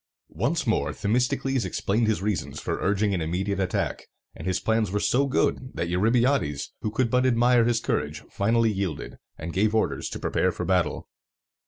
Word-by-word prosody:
Once 140 - 0
more 110 - 0
Themistocles 125 +4 0
explained 110 +3 0
his 110 -3 0
reasons 105 -2 -2
for - - -3
urging 100 +1 +1
an 90 - -1
immediate 95 +5 -1
attack; 95 -1 -2 0.3
and 80 - -7
his 95 0 +1
plans 110 -2 +1
were 105 +2 -1
so 135 +6 +2
good, 130 -1 0
that 85 - -2
Eurybiades, 110 - +1
who 110 - -1
could 115 +2 0
but 125 0 +3
admire 120 -1 +4
his 120 -1 +2
courage, 75 -8 -2
finally 115 +2 +2
yielded, 95 -6 -4 0.2
and 85 +2 -6
gave 105 +3 +2
orders 110 - 0
to - - -5
prepare - - +1
for - - -4
battle. - - 0
110 Hz, 175 wpm, -26 LUFS, 95-120 Hz, 0.3 s, admire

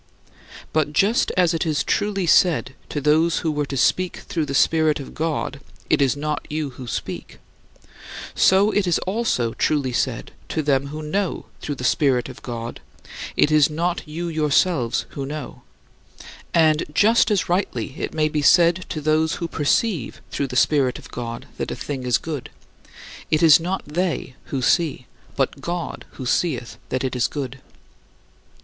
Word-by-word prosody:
But 155 -1 +1
just 205 +9 +3
as 180 -2 +4
it 165 - 0
is 155 -3 0
truly 205 -2 0
said 165 -5 +3 0.2
to 145 - -2
those 155 +3 +3
who 160 - +2
were 150 -1 -1
to 135 - -4
speak 180 +8 +2
through 160 -4 -3
the 140 - -3
Spirit 155 0 +3
of 140 - -8
God, 155 -3 -2 0.3
"It - - +4
is 135 0 +2
not 150 0 -2
you 150 -2 -2
who 125 -1 -10
speak," - - -5 1.0
so 195 +3 +4
it 205 -3 +1
is 175 - +3
also 185 - 0
truly 140 -5 0
said - - -1 0.2
to 155 - -1
them 140 -1 +1
who 155 +2 -6
know 190 +5 -2 0.2
through 145 - -3
the 125 - -8
Spirit 130 -1 +2
of - - -11
God, 115 -1 -6 0.6
"It 150 - +4
is 155 -1 +5
not 170 +3 -1
you 165 +3 -4
yourselves 155 -4 +1
who 140 - -5
know," 145 +1 -6 0.9
and 155 -2 +4
just 220 +10 +4
as 205 -4 +1
rightly 175 - -1
it - - -3
may 155 -1 +1
be 150 -1 -1
said 175 +4 +4
to 155 - -4
those 155 +1 +2
who 170 - -3
perceive 160 - 0
through 140 - -1
the 125 - -7
Spirit 130 0 +3
of - - -13
God 115 -1 -5
that - - -2
a - - -3
thing 135 -3 -5
is 120 - +4
good; 150 -6 -6 0.8
it 155 +1 +2
is 160 -1 +8
not 180 +3 -3
they 165 -3 -2
who 135 -2 -3
see, 155 -4 +1 0.3
but 140 0 -1
God 170 +2 -4
who 130 - -7
seeth 125 0 -1
that 130 - -1
it 130 -1 -2
is 125 - +2
good. 135 -2 -5
150 Hz, 170 wpm, -22 LUFS, 135-170 Hz, 1.0 s, is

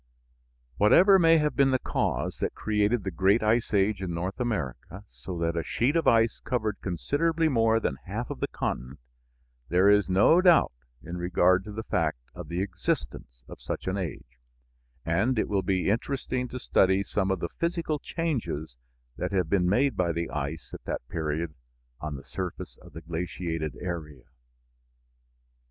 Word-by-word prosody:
Whatever 190 - +6
may 165 -1 +6
have 150 -3 0
been 140 -1 +4
the 130 - +3
cause - - -2
that - - -2
created 105 +1 +1
the 95 - -3
great 95 +7 +3
ice 115 +2 +2
age 100 -1 +2
in 90 -3 -3
North 90 +6 -4
America, 95 - -4
so 90 -2 -8
that 85 0 -1
a 85 - 0
sheet 125 - 0
of 165 - +1
ice 115 0 +4
covered 110 -5 -2
considerably 155 - 0
more 115 -5 +3
than 65 - -2
half - - -4
of - - -6
the - - -1
continent, 65 +3 -4 0.7
there 95 +4 +5
is 105 -1 +3
no 105 - +5
doubt 175 -4 +5 0.3
in 85 +1 -6
regard 90 +1 +3
to 105 - -7
the 110 +2 -5
fact - - 0 0.2
of 90 -3 -8
the 85 +4 -2
existence 65 -9 -4
of - - -11
such - - -5
an 95 - -1
age, 75 -10 -6 0.7
and 105 +10 +1
it - - +1
will 100 -2 +1
be 95 0 +1
interesting 125 +2 -2
to 125 - -7
study 95 -5 +2
some 100 -1 -1
of 95 -1 0
the 85 - -3
physical 170 -3 -1
changes 115 - -3 0.4
that - - -3
have 90 -4 0
been 90 -3 +3
made 130 +5 +2
by 90 -3 +1
the 85 0 -3
ice 75 +2 -5
at - - -8
that - - -4
period 80 0 -2 0.5
on 75 0 -4
the 70 - -9
surface 90 +7 -6
of - - -15
the 80 - -8
glaciated 80 -3 -4
area. 85 -5 -6
95 Hz, 175 wpm, -27 LUFS, 85-115 Hz, 0.7 s, Whatever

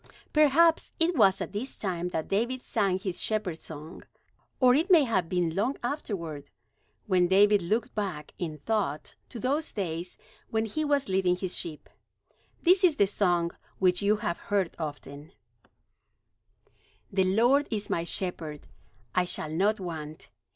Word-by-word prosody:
Perhaps 310 +2 +4
it 335 +1 +2
was 195 -7 +4
at - - -5
this 235 +6 -4
time 180 -3 -2
that 160 -3 -3
David 240 +6 -1
sang 195 -4 0
his 190 -2 -4
shepherd 205 -7 -2
song, 155 +1 -9 0.6
or 250 -1 +6
it 315 +8 +2
may 340 -5 +7
have 190 -9 0
been 175 -3 0
long 235 +8 0
afterward, 170 - -4 0.6
when 180 -3 +3
David 205 +2 +5
looked 215 +7 -1
back 185 -8 -4
in 160 -4 -4
thought 185 -4 -2 0.2
to 245 - -8
those 285 +7 -1
days 175 -3 -4 0.3
when 220 0 0
he 310 +9 -2
was 285 -2 +1
leading 185 -2 +2
his 185 0 -3
sheep. 155 -3 -5 0.8
This 370 +2 +5
is 345 -5 +5
the 205 - +4
song, 175 -4 +1 0.3
which 180 -1 +2
you 205 +1 +3
have 170 -5 -3
heard 195 -4 -1
often: 145 +1 -7 1.8
"The 190 -1 +2
Lord 265 +6 +4
is 210 -2 -3
my 165 - -1
shepherd; 170 -4 -3 0.5
I 180 - +2
shall 155 -3 -2
not 200 +6 +1
want. 160 -4 -7
195 Hz, 150 wpm, -28 LUFS, 170-235 Hz, 1.8 s, may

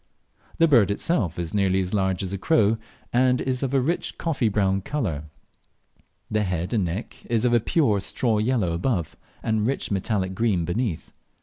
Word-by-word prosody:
The 165 - +5
bird 120 - +5
itself 100 - 0
is 85 -2 -4
nearly 95 -2 +2
as 95 +1 -2
large 95 -2 0
as 95 0 -4
a 100 - -3
crow, 110 -5 +3 0.3
and 125 +1 +3
is 130 -1 -1
of 135 -2 -1
a 140 - +3
rich 160 +7 -1
coffee 140 -9 0
brown 95 -2 +1
colour. 95 - -3 1.1
The 110 0 +1
head 90 -1 -2
and 105 -4 +2
neck 90 +7 -5
is 115 0 +1
of 120 - +3
a 120 - +5
pure 110 -4 +2
straw 110 +2 0
yellow 110 -5 +1
above 85 - -1 0.3
and 110 -1 +1
rich 135 -3 -2
metallic 95 -1 -1
green 100 -5 +1
beneath. 90 -1 -2
105 Hz, 180 wpm, -24 LUFS, 95-125 Hz, 1.1 s, The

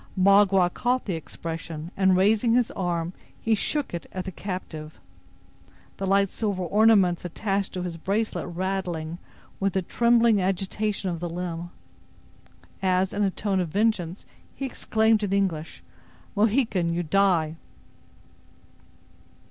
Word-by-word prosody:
Magua 195 -1 +5
caught 250 +1 0
the 190 - -2
expression, 165 0 -6
and 190 -1 +4
raising 220 +4 +3
his 245 -2 +2
arm, 175 -2 -2 0.3
he 225 - +1
shook 280 +5 -1
it 170 - -5
at 185 -1 -5
the 190 - -4
captive, 165 -5 -6 1.0
the 195 - -3
light 195 0 +3
silver 200 -4 -2
ornaments 200 -2 +4
attached 195 +2 -2
to 180 - -3
his 175 -2 -4
bracelet 205 +6 -1
rattling 175 -2 -3 0.4
with 195 -1 0
the 190 - 0
trembling 235 0 +3
agitation 195 +1 -1
of 170 - -4
the 175 0 -3
limb, 175 0 -4 1.1
as, 185 0 +1
in 205 - -1
a 200 - +3
tone 195 0 -1
of 180 - 0
vengeance, 195 -2 0 0.3
he 275 - -4
exclaimed, 220 -3 +1
in 205 -2 -2
English: 180 -6 -1 0.5
"Mohican, 210 -5 +2
you 175 +1 -1
die!" 165 -2 +2
190 Hz, 130 wpm, -26 LUFS, 175-210 Hz, 1.1 s, Magua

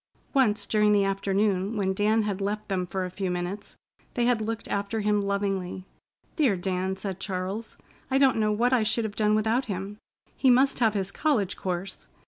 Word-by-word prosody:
Once 220 -7 +2
during 210 0 +3
the 200 -1 +4
afternoon, 195 +1 0
when 190 -2 +1
Dan 215 +3 +2
had 205 -2 -3
left 210 +2 -3
them 185 -2 -1
for 190 +1 -2
a 180 - -6
few 190 0 -3
minutes, 180 +3 -4 0.4
they 240 - +1
had 240 -2 +2
looked 225 +1 -3
after 205 +2 -2
him 210 0 +2
lovingly: 195 -2 -2 0.5
"Dear 270 - +3
Dan!" 185 +1 -2
said 190 -1 -5
Charles. 195 +3 -4 0.3
"I 265 - +2
don't 270 -3 +4
know 215 -1 +2
what 240 +4 +2
I 250 - +4
should 220 +2 +1
have 215 -1 -4
done 215 -1 +2
without 225 +4 +1
him. 200 0 -5 0.4
He 265 - +3
must 265 +3 +4
have 225 -3 +3
his 195 -1 -1
college 220 -11 0
course. 185 +1 -5
205 Hz, 190 wpm, -27 LUFS, 190-220 Hz, 0.5 s, the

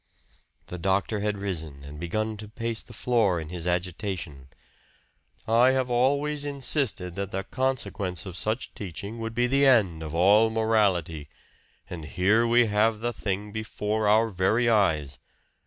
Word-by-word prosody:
The 90 - -7
doctor 95 +4 0
had 105 0 -1
risen 80 -8 -5
and 75 +1 -9
begun 110 +6 -2
to 105 0 -8
pace 115 +1 -4
the - - -16
floor 110 -8 +1
in 80 -1 -7
his 90 -1 -5
agitation. 90 -5 -3 1.0
"I 120 +3 +5
have 130 -1 0
always 140 +4 +1
insisted 135 - -1
that 100 +1 -4
the 95 0 -3
consequence 105 - -2
of 95 -3 -7
such 110 +5 -3
teaching 100 +4 -7
would 115 0 -5
be 120 - +2
the 135 +3 +3
end 100 -11 +3
of 80 0 -6
all 105 +6 +5
morality. 100 -9 +1 0.6
And 85 -3 -7
here 100 +8 +2
we 120 +1 +5
have 105 +1 +1
the 120 +1 -1
thing 105 0 -3
before 110 0 -2
our 110 +2 +4
very 105 +5 +1
eyes! 80 - +2
105 Hz, 155 wpm, -26 LUFS, 90-115 Hz, 1.0 s, I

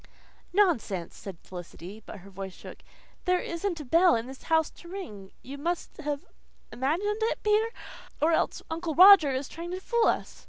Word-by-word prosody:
"Nonsense!" 310 - +1
said 195 -4 -9
Felicity, 180 +3 -10
but 205 - -10
her 200 +2 -14
voice 190 -1 -7
shook. - - -11 0.5
"There 360 0 +3
isn't 340 0 -3
a 300 - -7
bell 335 +7 +5
in 225 0 -2
the 265 - -8
house 320 -1 +2
to 345 - -15
ring. 265 - -8
You 280 +2 -8
must 345 +3 -3
have 290 -2 -4 0.5
imagined 355 - -1
it, 450 - -1
Peter. 425 +2 +3 0.5
Or 315 +2 +3
else 320 - 0
Uncle 320 -1 -3
Roger 370 -5 +9
is 260 +1 -2
trying 335 +1 -8
to 365 +1 -4
fool 470 +4 +1
us." - - -1
320 Hz, 175 wpm, -28 LUFS, 230-365 Hz, 0.5 s, Roger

